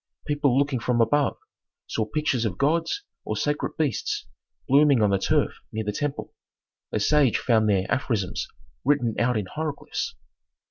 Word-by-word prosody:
People 145 -3 +2
looking 140 -2 +1
from 120 0 0
above 145 +5 +2 0.5
saw 110 - -1
pictures 145 -3 0
of 100 -6 -2
gods 165 - +1 0.2
or - - -3
sacred 150 0 -1
beasts 155 -4 -1 0.4
blooming 140 -1 +5
on 105 -2 +3
the 100 - +2
turf - - +1
near 110 0 -3
the 105 - -2
temple; 145 +6 -3 0.6
a - - 0
sage 140 +2 +3
found 110 -3 +2
there 95 -2 +2
aphorisms 110 -8 -1 0.4
written 130 -4 +2
out 120 0 +2
in 105 - -1
hieroglyphs. 150 +8 -4
130 Hz, 150 wpm, -25 LUFS, 110-145 Hz, 0.6 s, blooming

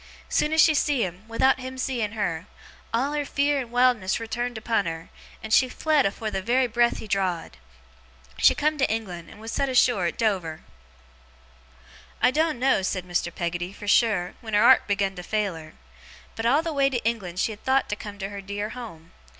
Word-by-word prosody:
Soon 300 - +1
as 320 - +1
she 315 0 +7
see 290 -4 +1
him, 185 +3 -6
without 260 +4 +2
him 260 0 -7
seeing 240 -5 -2
her, 180 -5 -3 0.4
all 255 +5 0
her 295 -1 0
fear 285 0 +1
and 250 -3 -5
wildness 245 -6 +2
returned 240 +1 -3
upon 220 -3 0
her, 165 0 -6 0.3
and 220 0 -3
she 255 +2 +5
fled 305 -3 +2
afore 215 +2 -4
the 190 - -2
very 245 +5 +2
breath 240 0 +2
he - - -8
draw'd. 185 - -2 0.8
She - - +6
come 305 0 0
to 270 - +2
England, 185 -7 -4
and 210 - -14
was 225 +1 -7
set 275 - 0
ashore 245 -7 +3
at - - -4
Dover. 185 -8 -1 1.6
'I 250 - +4
doen't 315 0 +1
know,' 260 -5 +3
said 185 -1 -2
Mr. 175 -1 -1
Peggotty, 175 +2 -3
'for 205 - -10
sure, 200 -4 +2
when 220 -2 -3
her 210 - +5
'art 260 +2 +6
begun 200 -1 0
to - - -5
fail 210 0 -1
her; 160 -1 -11 0.6
but 225 - -1
all 285 +6 +3
the 330 -1 -3
way 275 -1 +3
to 245 -4 -3
England 195 -6 -2
she 225 - +1
had 215 - -11
thowt 265 0 +2
to 210 - -1
come 205 -1 -9
to 195 -1 -5
her 200 -1 -7
dear 200 +2 -4
home. 215 -10 -10
220 Hz, 205 wpm, -25 LUFS, 190-255 Hz, 1.6 s, she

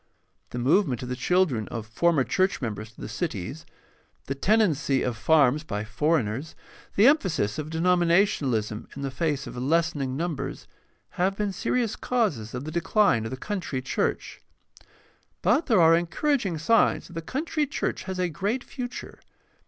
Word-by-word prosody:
The - - -6
movement 135 - +2
of 125 - -6
the 125 - -2
chil 180 +9 +3
dren 115 - -3
of 115 -3 -5
former 145 +6 +2
church 185 +7 +1
members 110 -3 -5
to 110 - -16
the - - -5
cities, 135 - -4 0.6
the 135 - -2
tenancy 155 - +2
of 125 - -1
farms 150 +2 +3
by 105 -9 -3
foreigners, 130 +2 -1 0.4
the 205 - +5
emphasis 190 - +2
of 155 0 -4
denominationalism 165 - +1
in 140 - -6
the 135 - -2
face 145 0 -1
of - - -8
lessening 140 0 0
numbers, 165 -2 -4 0.6
have 190 +2 +2
been 205 -2 -1
serious 235 +2 0
causes 165 - -1
of 125 - -4
the 155 - -5
decline 170 - +2
of - - -3
the 130 - -5
country 175 -4 -3
church. 130 - -2 1.0
But 240 - +3
there 225 -8 +4
are 165 0 +7
encouraging 180 - 0
signs 225 +9 +3
that 180 - -13
the 165 - -4
country 295 - -2
church 280 - -3
has 190 -1 -4
a 180 -1 +1
great 200 +9 -2
future. 250 -2 -7
160 Hz, 160 wpm, -26 LUFS, 130-195 Hz, 1.0 s, are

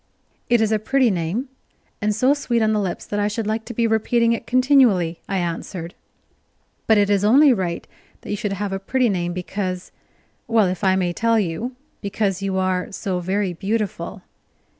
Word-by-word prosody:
"It 240 -1 +4
is 220 -1 +2
a 215 - +2
pretty 260 +2 +2
name, 185 - -2 0.5
and 210 0 +1
so 255 +5 +4
sweet 240 -5 0
on 220 0 +2
the 210 - +1
lips 185 -3 -3
that 205 - -3
I 205 - +2
should 215 +1 -3
like 220 +1 -2
to 240 - -7
be 235 - +2
repeating 230 +1 +2
it 230 - -5
continually," 250 - +3
I 195 - 0
answered. 170 0 -4 0.9
"But 220 - +5
it 205 -1 +4
is 200 -1 +2
only 265 +6 +6
right 180 -6 -3 0.4
that - - -7
you - - 0
should 205 -1 -2
have 195 0 -3
a 195 - -2
pretty 250 +5 +1
name, 175 -3 -1
because 185 0 -4 0.6
well, 225 -3 +4
if 185 +1 -3
I 190 -1 +4
may 180 -2 0
tell 230 +3 +2
you, 210 +7 -3 0.3
because 200 -2 -1
you 195 -1 -1
are 185 0 0
so 190 -2 -3
very 190 +1 -1
beautiful." 205 +4 -3
205 Hz, 190 wpm, -22 LUFS, 185-230 Hz, 0.9 s, only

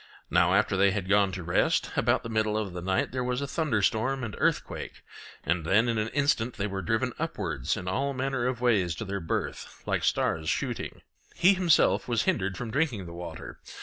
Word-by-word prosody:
Now - - +4
after - - +2
they 100 +1 +4
had 95 -1 -2
gone 100 -1 +3
to 90 -1 -5
rest, 85 +1 +1
about - - +2
the 115 - -6
middle 110 -1 0
of 105 -4 -3
the 90 - -5
night 95 +1 0
there 125 0 -2
was 125 0 -1
a 140 - -2
thunderstorm 130 -2 0
and 110 -3 -4
earthquake, - - -1 0.4
and 85 +2 0
then 100 +8 +3
in 115 -2 0
an 105 - 0
instant 125 -3 0
they 100 - -2
were 95 -1 -3
driven 115 +7 0
upwards 90 - -2
in 90 - -6
all 135 +9 0
manner 135 -2 -1
of 125 -2 -2
ways 100 -9 +2
to 110 - -5
their 100 0 -3
birth, 80 - -4
like - - -1
stars 80 0 +1
shooting. 75 -2 -3 0.3
He 185 +3 +5
himself 180 -4 +3
was 115 -3 +1
hindered 95 -1 0
from 115 +1 -5
drinking 130 - 0
the 85 - -9
water. 85 +1 -8
110 Hz, 205 wpm, -28 LUFS, 95-125 Hz, 0.4 s, He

